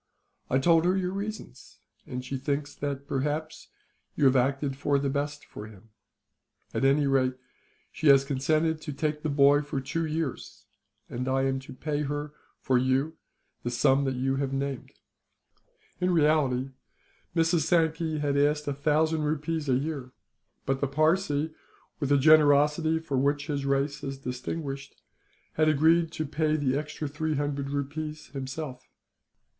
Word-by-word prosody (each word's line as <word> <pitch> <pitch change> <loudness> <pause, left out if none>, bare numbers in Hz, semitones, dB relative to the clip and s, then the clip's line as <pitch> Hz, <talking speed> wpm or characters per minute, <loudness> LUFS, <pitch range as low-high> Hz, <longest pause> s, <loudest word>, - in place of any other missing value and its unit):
I 130 - +3
told 165 +4 +4
her 185 +2 +3
your 180 -1 -1
reasons, 200 - -7 0.3
and 125 0 -5
she 135 - -4
thinks 140 +2 -2
that, 140 -1 -4
perhaps, 150 +4 -3 0.5
you 145 - +2
have 135 0 +5
acted 135 +2 +1
for 145 +1 +1
the 140 -1 -1
best 145 +1 -3
for 105 - -9
him. 110 +1 -16 0.8
At - - -1
any 140 +2 +4
rate, 130 -2 +2 0.6
she 155 - -2
has 135 -1 +7
consented 155 +4 0
to 150 - -5
take 150 +1 -2
the 155 - -2
boy 140 0 +5
for 145 -2 -3
two 165 +5 -2
years; 155 -3 -4 0.4
and 125 +2 -4
I 135 0 +1
am 135 0 0
to 135 - -11
pay 150 +2 -2
her, 145 +1 -3 0.3
for 130 -2 +2
you, 135 +5 0 0.4
the 120 - -3
sum 135 +3 +3
that 135 -1 -1
you 135 +1 0
have 135 -1 -1
named." 135 0 -3 1.1
In 180 0 +1
reality, 150 -6 +2 0.6
Mrs. 165 +1 +3
Sankey 160 -1 +1
asked 145 +1 +1
a 145 - 0
thousand 155 +3 +1
rupees 150 0 -2
a 130 - +4
year; 135 -2 -3 0.5
but 135 0 -1
the 140 - +2
Parsee, 155 +1 +1 0.5
with 140 -3 -1
the 145 - +5
generosity 150 +2 +5
for 155 -5 -2
which 145 +2 +1
his 140 -2 -2
race 140 +1 0
is 135 0 -4
distinguished, 135 +2 -5 0.5
had 155 0 +3
agreed 160 +3 +3
to 155 - -2
pay 155 +1 0
the 140 -3 0
extra 150 +1 -3
three 155 +2 -2
hundred 140 -1 -2
rupees 150 +2 -4
himself. 130 -1 -6
145 Hz, 155 wpm, -28 LUFS, 135-155 Hz, 1.1 s, has